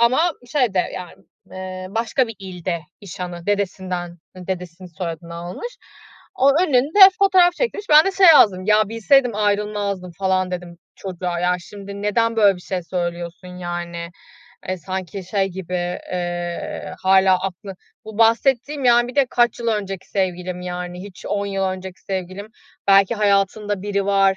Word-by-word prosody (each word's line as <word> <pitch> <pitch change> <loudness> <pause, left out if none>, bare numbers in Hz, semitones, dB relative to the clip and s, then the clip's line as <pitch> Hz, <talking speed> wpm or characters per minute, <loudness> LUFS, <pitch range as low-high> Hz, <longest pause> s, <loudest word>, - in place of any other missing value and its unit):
ama 260 +9 +3 0.2
şeyde, 245 -10 +1 0.2
yani, 180 -2 -7 0.4
eee, 185 0 -7
başka 230 +4 0
bir 225 - -8
ilde 180 -3 -4 0.2
iş 195 -2 -10
hanı, 175 -1 -6
dedesinden, 185 -3 -2 0.2
dedesinin 180 -1 -6
soyadını 170 -1 -6
almış. 180 - -7 0.6
O 270 +2 +5
önünde 290 +2 +2 0.2
fotoğraf 370 -3 +5
çektirmiş. 420 -1 -3
Ben 305 +1 +8
de 390 - +1
şey 385 -1 +5
yazdım: 205 - +6
"Ya, 215 -1 +4
bilseydim 235 +2 +3
ayrılmazdım" 205 -3 -1
falan 185 -1 +1
dedim 175 -1 -6 0.2
çocuğa. 180 -2 -4
Ya, 180 0 +2
şimdi, 200 +2 -9
neden 230 +2 +1
böyle 200 -4 +5
bir 180 - -13
şey 185 -2 -3
söylüyorsun 175 0 -4
yani? 175 -1 -5 0.6
E, 185 - -1
sanki 185 +2 -5
şey 195 +1 0
gibi, 185 -1 -6 0.4
eee, 175 -1 -4
hâlâ 190 0 +5
aklı 195 0 -6 0.3
bu 220 0 -9
bahsettiğim, 260 +5 +2
yani, 240 0 +5
bir 250 - -8
de 280 -2 +3
kaç 240 -1 +2
yıl 235 - -4
önceki 195 -4 -3
sevgilim, 180 -2 -2
yani 180 0 -5
hiç 195 -2 -11
10 200 0 -1
yıl 195 -1 -1
önceki 185 -1 -5
sevgilim. 190 +1 -5 0.4
Belki 195 +3 +5
hayatında 205 -1 +1
biri 200 -1 -1
var, 195 -1 +3
195 Hz, 150 wpm, -21 LUFS, 180-215 Hz, 0.6 s, Ben